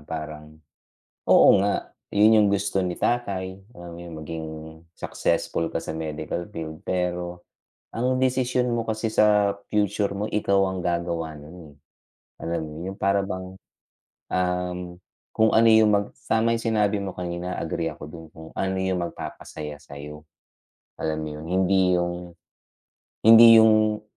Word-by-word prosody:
parang, 75 -1 -7 0.7
oo - - +7
nga, 100 +1 -1 0.2
yun 110 +2 +5
yung - - +3
gusto 95 -1 0
ni 90 - -1
tatay, 95 -6 -2 0.2
alam 85 -1 -10
mo - - -11
yung 85 -2 -9
maging 80 +1 -6 0.5
successful 85 -1 -2
ka 80 - -1
sa 80 - -6
medical 80 +2 -4
field, 80 -1 -7
pero 90 -1 -2 0.5
ang 125 +2 0
desisyon 125 -1 +1
mo 115 - 0
kasi 110 0 -3
sa 105 -1 +4 0.2
future 105 -1 +1
mo, 105 - -2
ikaw 100 -2 0 0.2
ang 90 - -4
gagawa 85 -2 -2
nun, 75 +4 -12
eh. - - -17 0.7
Alam 85 0 -2
mo 75 - -8
yun, 95 +2 -6
yung - - -27
para 100 0 +2
bang, 95 -1 -5 0.8
um, 90 0 -1 0.5
kung, 110 0 +3
ano, 115 +1 +5
yung 110 -1 +6
mag 100 0 -1 0.2
tama 115 +1 +2
yung 115 - -1
sinabi 105 -2 +1
mo 95 -2 -5
kanina, 90 0 -4
agree 80 0 -2
ako 75 -1 -9
dun, 80 +2 -10
kung 80 0 -11
ano 95 0 -2
yung 95 -1 0
magpapasaya 75 -3 -7
sayo, 75 +2 -11 0.7
alam 80 -1 -2
mo 80 - -4
yun, 75 - -9
hindi 95 +1 +2
yung 85 0 -2 0.9
hindi 115 0 +9
yung 110 -1 +3
90 Hz, 150 wpm, -24 LUFS, 80-105 Hz, 0.9 s, hindi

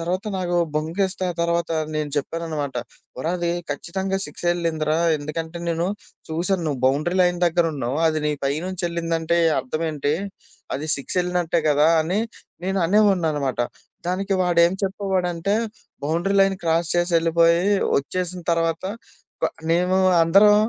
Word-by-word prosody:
తర్వాత 180 +5 -2
నాకు 180 -1 -2 0.2
బొంకిస్తా 185 +5 -1
ఆ - - -17
తర్వాత 170 0 0 0.2
నేను 150 -1 -2
చెప్పాననమాట, 150 -2 -3 0.4
ఒరా 160 - -1
అది 170 0 0 0.2
ఖచ్చితంగా 190 +2 -2
6 - - -10
ఎళ్ళింది 165 -3 -1
రా 155 - +3 0.2
ఎందుకంటే, 160 +3 -5
నేను 170 +1 0 0.4
చూసాను 175 +3 0
నువ్వు 140 -4 -2
బౌండరీ 150 +7 +1
లైన్ 175 -1 +2
దగ్గర 170 0 +2
ఉన్నావు, 135 +1 -2
అది 155 -1 +1
నీ 150 - +1
పైనుంచి 170 +7 -2
వెళ్ళిందంటే 170 0 0 0.2
అర్థం 155 +6 -3
ఏంటి? 145 -1 0 0.6
అది 145 +3 -3
సిక్సెళ్ళినట్టే 175 +3 0
గదా 150 +1 +4
అని 175 +6 0 0.5
నేను 190 +1 0
అనేవాడినిననమాట. 165 - +2 0.5
దానికి 195 +2 0
వాడేం 170 -1 +4
చెప్పేవాడంటే, 190 -1 -1 0.5
బౌండరీ 170 +6 0
లైన్ 195 0 +3
క్రాస్ 165 0 +1
చేసెళ్ళిపోయి 170 0 +3 0.4
ఒచ్చేసిన 180 +5 -3
తర్వాత 165 +1 0 0.6
క - - +4 0.3
మేము 180 +2 +2 0.3
అందరం 195 +5 +6
170 Hz, 130 wpm, -23 LUFS, 155-180 Hz, 0.6 s, అందరం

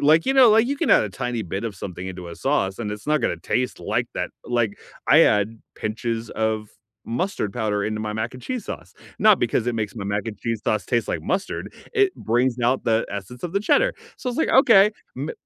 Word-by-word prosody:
like, 155 +3 +4
you 270 - +2
know, 255 -4 +8
like, 225 +2 +5
you 280 - -1
can 325 - 0
add - - +7
a - - -3
tiny 125 -2 -3
bit 95 +4 -4
of 110 -3 -3
something 90 0 -6
into 90 -2 -7
a 85 - -9
sauce, 100 -9 0
and 105 -3 -3
it's 105 +5 -9
not 150 -2 +2
gonna 85 - 0
taste 125 +8 -2
like - - -1
that, - - -2 0.2
like, 120 -4 0 0.3
I - - +8
add 105 +2 +2 0.2
pinches 115 +1 -3
of 110 -1 -1 0.4
mustard 120 - -2
powder 105 -4 -1
into 110 0 -2
my 105 -1 -3
mac 110 +3 -3
and 125 - -10
cheese 255 -3 -4
sauce, - - -7 0.3
not 215 -2 +6
because 120 0 +1
it 120 - -1
makes 105 -3 -3
my 105 - -4
mac 100 +1 -1
and 110 - -5
cheese 115 -2 -2
sauce 105 -4 0
taste 120 -3 +1
like - - -2
mustard, 190 +1 -2 0.2
it 400 -3 +3
brings 120 +2 +1
out 125 +2 +2
the 115 0 +2
essence 100 +5 -7
of 170 - -4
the 200 - +2
cheddar, - - +3 0.2
so, 260 - -5
it's 245 - -5
like, 320 - +2
"Okay, 220 -6 +7 0.3
ma" 140 +5 -3
115 Hz, 235 wpm, -23 LUFS, 105-165 Hz, 0.4 s, know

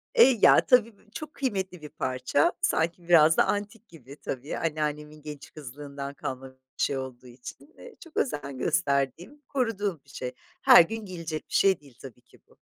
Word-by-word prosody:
Eee, 265 - +7
ya - - +7
tabii 235 -4 +3
b 215 - -26
çok 305 +4 -8
kıymetli 190 - -3
bir 150 - -9
parça 130 +2 0
sanki 170 +1 0
biraz 160 -2 +6
da - - +5
antik 210 +3 -3
gibi 140 -4 -14
tabii 135 +3 -5
anneannemin 150 -1 -3
genç 150 -1 -9
kızlığından 140 0 -8
kalma 130 -1 -6
bir 130 - -29 0.3
şey 140 - 0
olduğu 130 -1 -7
için. 125 - -12
Eee, 485 -3 -13
çok 330 - -14
özen 140 - -2
gösterdiğim, 160 - -1
koruduğum 205 - -2
bir - - -23
şey. 125 -1 -5 0.3
Her - - +9
gün 220 +4 -6
giyilecek 165 -4 -6
bir - - -12
şey 195 -1 +4
değil 140 -5 -19
tabii 125 -2 -11
ki - - -23
bu. - - -25
155 Hz, 180 wpm, -27 LUFS, 140-205 Hz, 0.3 s, Her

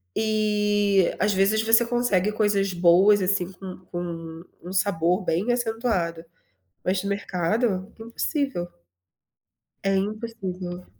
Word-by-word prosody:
E, 210 -3 +2
às 210 +2 +2
vezes 200 +3 +2
você 225 +1 +4
consegue 230 -5 +1
coisas 205 -3 +1
boas, 185 +4 +5
assim, 185 -1 0
com 185 -1 -9
com 165 -2 -6 0.2
um 180 +2 -7
sabor 185 -1 +1
bem 180 +8 0
acentuado. 225 -9 -1 0.6
Mas 185 +1 0
no 200 - -3
mercado, 200 +1 -1
impossível. 235 - -2 1.2
É 195 0 +2
impossível. 190 -4 -4
195 Hz, 110 wpm, -24 LUFS, 180-215 Hz, 1.2 s, boas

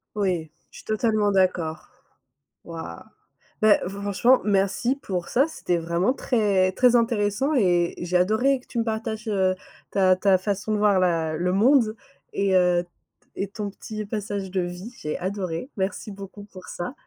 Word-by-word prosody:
Oui, 180 -6 -1 0.2
je - - -14
suis - - -13
totalement 215 -1 +1
d'accord. 180 -4 0 0.8
Wouah! 165 - -8 0.6
Ben 215 -1 +6
franchement, 200 +6 +2
merci 200 +5 +1
pour 180 -9 -4
ça, 270 +5 +3
c'était 180 - -2
vraiment 170 +7 0
très 205 -8 +1
très 245 +4 +4
intéressant 230 +4 +1
et 175 -7 +2
j'ai 175 +1 0
adoré 220 +9 +2
que 250 - -23
tu - - -7
me - - +2
partages, 220 0 -3
heu, 190 -2 +2 0.4
ta 185 -2 +4
ta 190 0 +3
façon 200 +2 -2
de - - +1
voir 205 -2 +4
la 165 -3 +1
le 180 +3 0
monde 225 +1 +4 0.4
et 195 -1 +1
heu, 180 -1 +3
t 175 - -24 0.5
et - - -3
ton 205 0 -5
petit 215 +1 -7
passage 200 -2 -4
de 190 -1 0
vie, 180 +6 -6
j'ai 150 - -3
adoré. 185 +3 -3
Merci 195 +2 -3
beaucoup 200 +1 -10
pour 185 -2 -13
ça. 175 +8 -5
200 Hz, 165 wpm, -24 LUFS, 180-215 Hz, 0.8 s, Ben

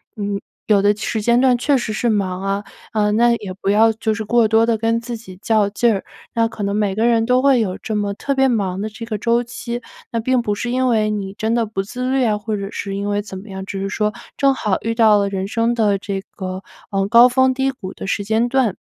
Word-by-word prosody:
嗯 205 -2 -3 0.3
有 205 -2 +4
的 205 +1 +3
时 215 +1 -3
间 235 +3 +3
段 255 -2 +4
确 275 +3 +2
实 235 -3 -3
是 215 +3 -1
忙 190 -4 -1
啊， 195 +1 -1 0.3
呃 210 -1 +2
那 235 +3 +4
也 190 -2 -5
不 - - -1
要 220 +2 +5
就 220 0 -1
是 220 +1 -4
过 235 +1 +3
多 225 +1 +4
地 230 -1 +1
跟 230 +1 0
自 235 0 -5
己 190 -5 -12
较 220 -3 +2
劲 230 +3 +2
儿， 195 - -4 0.3
那 230 -1 +2
可 225 -2 -6
能 200 0 -1
每 205 -2 0
个 220 +2 +1
人 230 -1 +3
都 250 +1 +3
会 270 -2 +4
有 190 -5 -1
这 220 - -5
么 205 -1 -1
特 275 +7 -2
别 270 0 +3
忙 195 -7 -1
的 215 - -2
这 230 +2 -8
个 220 -2 -3
周 235 +3 +1
期， 240 0 -6 0.3
那 230 - 0
并 255 +2 +1
不 210 -3 -1
是 240 +4 -3
因 255 +1 +1
为 220 -3 +2
你 195 -2 -4
真 220 0 0
的 235 -1 +1
不 205 -2 -3
自 250 +5 -4
律 265 0 +2
啊， 215 -2 +1
或 215 +1 -3
者 200 -1 -4
是 195 -1 -4
因 200 +1 -2
为 205 0 0
怎 200 -2 -8
么 200 +3 -11
样， 190 0 -6
只 195 0 -5
是 195 - -2
说 210 0 -1 0.2
正 275 -1 +4
好 210 -7 0
遇 230 +1 -2
到 220 -2 +5
了 200 0 +1
人 195 -1 -3
生 230 +1 +1
的 215 -4 +2
这 195 0 -4
个， 185 -1 -6 0.3
呃 195 -1 +1
高 235 +2 +8
峰 260 +1 +3
低 265 +1 0
谷 195 -7 -8
的 - - -7
时 200 - -1
间 220 +3 +1
段。 245 -6 +1
220 Hz, 280 characters per minute, -19 LUFS, 200-235 Hz, 0.3 s, 高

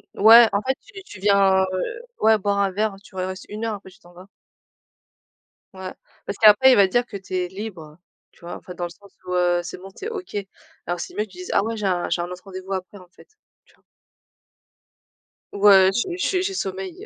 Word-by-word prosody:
Ouais, 230 +3 +8
en 200 - 0
fait, 265 +3 -1
tu 400 -1 -12
tu 210 - -12
viens, 195 -1 +4
heu, 185 - -3 0.2
ouais, 220 0 +5
boire 200 0 -1
un 195 -1 +1
verre, 210 +1 -1
tu - - -18
re - - -4
restes 185 +1 -5
1 215 +2 -5
heure, 220 -2 -2
après 195 -1 -12
tu 205 - -21
t'en 175 -2 -19
vas. 180 +2 -14 1.5
Ouais. 190 -1 -7 0.3
Parce 200 - -5
qu'après 215 +5 +7
il - - +6
va 200 -1 +5
dire 240 +6 +1
que 205 -4 -7
tu 190 -1 -7
es 180 -1 -1
libre, 180 -7 -8 0.3
tu - - -26
vois? 175 - -6
Enfin, 180 - -11
dans 175 0 -4
le - - -6
sens 200 +3 -18
où, 180 - -4
heu, 175 -1 +2
c'est 175 - -7
bon, 190 +2 -11
tu 390 - -10
es - - -2
OK. 390 - -7 0.5
Alors 175 0 -3
c'est - - -7
mieux 210 - -2
que - - -25
tu 185 - -16
dises: 180 - -7
«Ah - - +3
ouais, 225 +1 -3
j'ai 210 -2 -4
un 180 -2 0
j'ai 175 - 0
un 175 - -5
autre 180 0 -9
rendez-vous 190 0 -7
après, 190 +2 -6
en 185 -2 -15
fait» - - -20 0.4
tu - - -27
vois? - - -35 1.7
Ou, 200 - -6
heu, 190 -1 +7
je 345 - -2
je 370 0 0
j'ai 390 +1 -2
sommeil. 190 - -5
195 Hz, 240 wpm, -22 LUFS, 185-215 Hz, 1.7 s, Ouais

